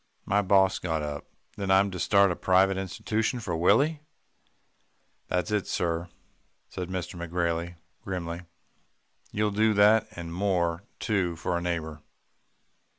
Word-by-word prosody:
"My 100 +1 +2
boss 95 -1 +3
got 80 -3 -2
up. 75 -1 -5 0.3
'Then 100 -1 -3
I'm 95 +1 +4
to 90 - -6
start 100 +1 +4
a - - -1
private 95 +2 +3
institution 105 +5 -2
for 100 -7 -3
Willie?' 135 - +3 1.3
"'That's 90 +3 -1
it, 105 -2 0
sir,' 85 0 -1 0.6
said 90 -1 -5
McGrailey 85 -1 -3 0.3
grimly. 85 -2 -4 0.9
'You'll 105 0 0
do 110 +1 +2
that, 105 +2 +5
and 85 -3 -7
more 90 -3 0 0.2
too 95 -6 0
for 90 +2 -2
a 85 - -1
neighbour. 80 -3 -3
95 Hz, 130 wpm, -27 LUFS, 85-100 Hz, 1.3 s, that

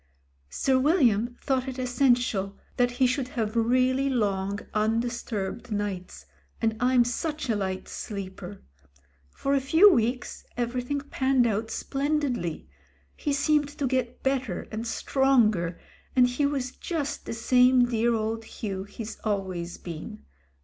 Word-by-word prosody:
"Sir 260 - +2
William 245 - +3
thought 265 -1 0
it 260 -1 -5
essen 250 0 +3
tial 200 -5 -2 0.2
that 245 0 +3
he 255 +1 +3
should 255 +1 0
have 230 -4 -3
really 255 +4 +2
long 200 -5 0 0.2
undisturbed 225 -1 -1
nights, 200 - -4 0.3
and 225 -1 +1
I'm 250 0 +4
such 295 +3 -3
a - - +1
light 190 -2 -3
sleeper. 195 -1 -7 0.7
For 275 - -2
a 275 - +3
few 330 +9 +6
weeks 245 -1 -1
every 245 +1 -1
thing 285 +3 -2
panned 265 -3 +1
out 220 0 0
splendidly. 275 - -2 0.5
He 290 - -2
seemed 290 +1 +2
to 285 - -1
get 255 -2 -1
bet 265 -1 +1
ter 180 -7 -5
and 225 +2 -4
stronger, 225 -10 +2 0.4
and 250 -1 +6
he 250 +4 +1
was 270 -3 -2
just 295 -2 -4
the - - -3
same 250 +2 +4
dear 235 0 +1
old 225 +1 -2
Hugh 195 -3 -5
he's 215 +1 -7
always 190 -5 -2
been. 160 - -8
245 Hz, 140 wpm, -27 LUFS, 210-265 Hz, 0.7 s, few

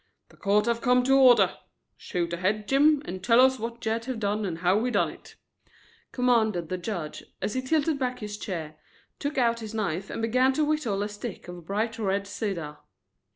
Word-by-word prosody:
"The - - -19
court 210 +1 +2
have 235 0 0
come 250 -1 +3
to 270 +2 +4
order. 255 -3 +5 0.4
Shoot 170 -2 -3
ahead, 205 +4 -1
Jim, 290 +2 +4
and 185 0 -6
tell 230 +3 +5
us 260 0 +5
what 230 +1 -5
Jed 225 -1 -2
have 255 -3 -4
done 210 0 -1
and 165 -3 -4
how 185 +5 +2
he 250 - 0
done - - +1
it," - - -15 0.8
commanded 220 -9 +1
the 185 - -2
judge, 175 -5 -5 0.2
as 210 - -2
he 260 - -1
tilted 300 +2 0
back 250 -1 -1
his 210 -3 -6
chair, 160 -5 -5 0.4
took 285 +1 -3
out 235 -2 +2
his 220 -1 -7
knife 195 -3 -2
and - - -5
began 255 +4 +3
to 305 +3 +1
whittle 265 -10 0
a - - -2
stick 210 0 -8
of 175 -2 -10
bright 220 +3 -2
red 200 -1 0
cedar. 190 -8 -4
220 Hz, 200 wpm, -27 LUFS, 195-250 Hz, 0.8 s, order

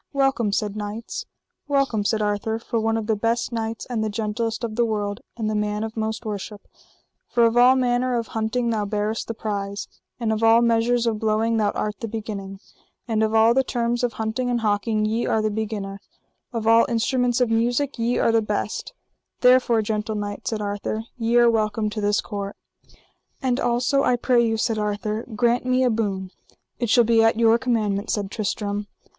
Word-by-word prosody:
Welcome, 270 -6 +1
said 205 0 -1
knights. 210 +2 -5 0.4
Welcome, 275 -7 +1
said 215 0 +1
Arthur, 210 +2 -1
for 230 0 -2
one 225 0 +1
of 225 - -3
the 220 0 +1
best 230 +3 0
knights, 225 -1 -3
and 235 -4 -2
the 215 - -1
gentlest 220 +2 -2
of 225 -2 -3
the 240 - +3
world, 205 -2 -2 0.2
and 220 -2 -2
the 215 - -1
man 210 0 -1
of 220 0 -5
most 220 +1 -3
worship; 205 0 -6 0.6
for 235 -1 +3
of 230 0 +2
all 250 +2 +6
manner 250 0 +1
of 230 -1 -3
hunting 230 +2 -1
thou 215 -2 0
bearest 210 +2 -2
the 230 - -4
prize, 200 -2 -4 0.3
and 225 -2 0
of 215 - -2
all 225 +1 +5
measures 235 +1 +2
of 225 -2 0
blowing 220 +1 +1
thou 210 -2 +2
art 210 -1 -3
the 230 - -4
beginning, 205 -3 -6 0.5
and 220 -2 0
of 220 0 +1
all 225 +1 +6
the 265 +2 +3
terms 240 -1 -1
of 240 -2 0
hunting 220 +4 -2
and 240 -1 0
hawking 215 0 +1
ye 225 +2 0
are 220 - +2
the 215 0 0
beginner, 205 -2 -4 0.5
of 230 -3 -3
all 230 +1 +5
instruments 245 +1 +1
of 245 -2 +2
music 240 +4 0
ye 235 +2 +1
are - - +3
the 225 0 +3
best; 210 - -3 0.5
therefore, 250 -3 +5
gentle 215 0 -2
knight, 205 -1 -5
said 215 -2 -2
Arthur, 205 +2 -3
ye 235 0 +1
are 240 0 +6
welcome 215 -1 +1
to 215 - -4
this 205 0 +2
court. 200 -1 -5 0.8
And 255 -1 0
also, 245 +3 +1
I 250 - +3
pray 240 0 +2
you, 225 -1 +1
said 220 0 0
Arthur, 210 +1 -2
grant 240 +2 +2
me 255 0 +2
a 250 - +3
boon. 195 -4 -2 0.5
It 240 - -1
shall 240 +2 +6
be 225 0 +4
at 225 0 +3
your 230 0 +4
commandment, 220 -5 0
said 200 -2 -1
Tristram. 205 -1 -2
225 Hz, 195 wpm, -23 LUFS, 210-235 Hz, 0.8 s, all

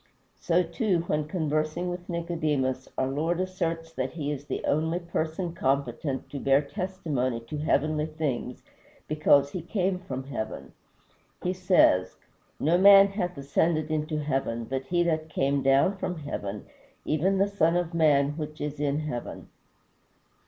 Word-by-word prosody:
So, 175 +1 +2
too, 195 -5 0
when 150 -3 -1
conversing 155 +1 -1
with 175 0 -7
Nicodemus, 155 -7 -1
our 130 - +1
Lord 155 +6 -1
asserts 165 -3 -2
that 130 -3 -3
he 150 -3 -3
is 145 -1 -5
the - - -4
only 160 +3 +1
person 170 0 -3
competent 135 -3 -1
to 140 - -4
bear 140 +2 +3
testimony 150 - -2
to 130 +6 -6
heavenly 155 0 +1
things, 150 -6 -3 0.4
because 145 -2 +3
he 180 - -4
came 185 +1 -1
from 135 -7 -5
heaven. 130 -5 -6 0.7
He 180 - 0
says, 180 - +3 0.4
"No 165 +4 +3
man 200 0 +8
hath 180 -4 -3
ascended 155 +3 0
into 155 0 -1
heaven 135 -6 -1
but 135 +3 -4
he 175 +2 +2
that 160 -2 -1
came 140 -2 +1
down 135 +8 +3
from 180 -2 -3
heaven, 105 -9 -5 0.4
even 180 +6 +1
the 195 - +4
Son 170 -5 +2
of 175 -1 -2
man 145 -4 +4
which 155 -1 -6
is 150 0 -4
in 145 +1 0
heaven." 135 -6 -6
155 Hz, 150 wpm, -27 LUFS, 140-175 Hz, 0.7 s, man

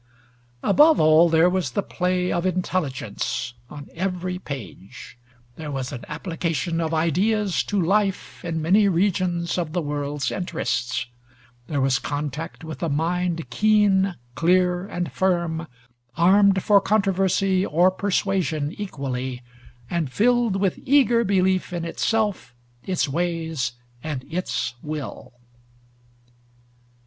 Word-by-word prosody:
Above 300 +10 +5
all, 155 +2 +6
there 165 +1 +5
was 185 0 0
the 200 - 0
play 180 0 -1
of 175 - 0
intelligence 155 - -2 0.2
on 145 -1 -9
every 180 0 -3
page; 120 - -9 0.4
there 155 -2 -6
was 135 -3 -4
an 120 - -7
application 165 -2 -2
of 160 -1 -1
ideas 185 +5 +1
to 205 - -1
life 195 +2 0
in 165 -2 -2
many 195 +6 +4
regions 180 -2 0
of 165 -3 -3
the 175 - 0
world's 145 -1 -2
interests; 125 -10 -2 0.6
there 145 - -1
was 135 0 +2
contact 150 +2 -5
with 160 +4 -7
a 170 - 0
mind 165 +1 -1
keen, 200 - +3 0.2
clear, 180 +3 +2
and 175 -7 -4
firm, 170 0 0 0.5
armed 190 +2 +5
for 205 -1 +5
controversy 195 -2 +2
or 175 +2 +3
persuasion 185 -6 -1
equally, 130 -9 -4 0.4
and 160 -2 -2
filled 235 - +2
with 195 -2 0
eager 250 -4 +4
belief 190 -2 +1
in 170 -1 -3
itself, 205 - -1 0.3
its 185 -4 0
ways, 160 -5 -2 0.3
and 145 -5 -4
its 180 -8 -2
will. 150 -2 -6
175 Hz, 120 wpm, -23 LUFS, 155-190 Hz, 0.6 s, all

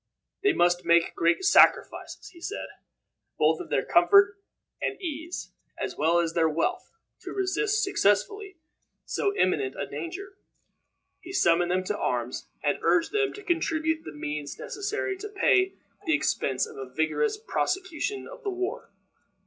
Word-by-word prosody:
They 400 0 +4
must 175 - +2
make 170 0 +3
great 170 - +1
sacrifices, - - +3
he 340 - -17
said, 415 - -5 0.7
both 160 +1 +3
of - - -9
their 135 - 0
comfort 200 +3 +5 0.4
and - - -2
ease, 335 -1 -5 0.3
as - - -4
well 165 +3 +2
as 170 -1 +1
of - - -20
their 160 -1 +4
wealth, 170 - -1 0.3
to - - -8
resist 400 +3 0
successfully 380 - +1 0.5
so 400 0 -1
imminent 405 -1 +1
a - - -1
danger. 390 +3 -7 0.8
He 370 0 -10
summoned 175 - +3
them 185 +1 +1
to 205 +2 -2
arms, 125 0 -2 0.2
and - - +1
urged 340 -1 +2
them 420 -1 +1
to 415 - -10
contribute 320 -2 0
the - - -8
means 150 -1 -5
necessary 410 -1 -3
to 420 +3 -7
pay 385 -2 +2 0.3
the 315 - +4
expense 135 - 0
of - - -12
a 135 -1 -7
vigorous 160 - 0
prosecution 380 -3 -2
of - - -11
the 415 - -2
war. 375 +1 -4
330 Hz, 155 wpm, -27 LUFS, -, 0.8 s, comfort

